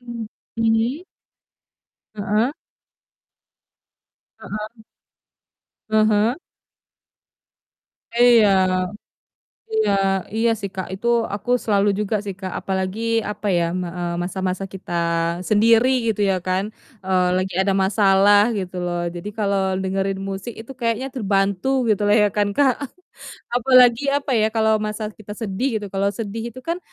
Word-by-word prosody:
Mmm, 235 -3 -7 0.3
hmm? 225 +5 +1 1.1
Heeh. 215 +5 0 1.9
Heeh. 215 +2 -7 1.1
Ah 215 0 +4
hah. 220 +4 +2 1.8
Iya. 240 -3 +6 1.2
Iya 440 - +2 0.4
iya 230 +1 +2
sih, 200 - -3
Kak, 185 -1 -4
itu 220 +5 -3 0.3
aku 210 +4 -5
selalu 205 -1 +2
juga 210 0 -1
sih, 195 -2 -5
Kak, 185 -2 -5
apalagi, 190 +2 -3 0.3
apa 210 0 -4
ya, 170 - +2
m 185 - -2
eee, 175 0 -4
masa-masa 185 +1 -3
kita 190 -2 -8 0.6
sendiri, 225 +3 +4 0.2
gitu 210 - -7
ya 190 - +1
kan, 185 +2 -1 0.3
eee, 185 -1 +1
lagi 185 0 -2
ada 190 +1 +2
masalah, 200 +2 +4
gitu 185 -4 -4
loh. 175 -1 -2
Jadi 175 +3 -7
kalau 200 -3 0
dengerin 195 0 -2
musik 195 +4 -5
itu 225 - -12
kayaknya 235 +1 -1
terbantu, 215 +1 0
gitulah 205 -1 +2
ya 210 -1 +5
kan, 205 -1 +1
Kak. 275 +3 +2 0.7
Apalagi, 245 +1 +5
apa 285 -1 -1
ya, 215 - +3
kalau 220 -1 +3
masalah 215 0 -4
kita 210 -1 -10
sedih 215 +3 -2
gitu, - - -4
kalau 195 +1 0
sedih 225 +2 -5
itu 255 - -10
kan, 335 +6 -2
210 Hz, 125 wpm, -21 LUFS, 195-230 Hz, 1.9 s, Iya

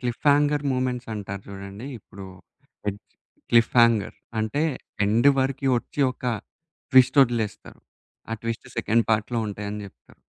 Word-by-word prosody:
Cliff 120 -2 -3
hanger 145 0 +2
moments 125 -1 -1
అంటారు 100 -2 -6
చూడండి. 100 +4 -8
ఇప్పుడు 100 -1 -12 0.6
ఎడ్ 100 0 -4 0.5
క్లిఫ్ 115 -1 +4
హంగర్ 115 -4 +3 0.2
అంటే 110 +7 0 0.4
ఎండ్ 115 +6 +4
వరకు 135 +1 0
ఒచ్చి 145 - -7
ఒక 125 - -15 0.7
ట్విస్ట్ 130 0 +6
ఒదిలేస్తారు. 115 -4 -3 0.5
ఆ - - -1
ట్విస్ట్ 115 0 -4
సెకండ్ 115 +1 +2
పార్ట్‌లో 110 +2 +1
ఉంటాయని 105 0 -5
చెప్తారు. 95 - -20
115 Hz, 130 wpm, -25 LUFS, 105-130 Hz, 0.7 s, ట్విస్ట్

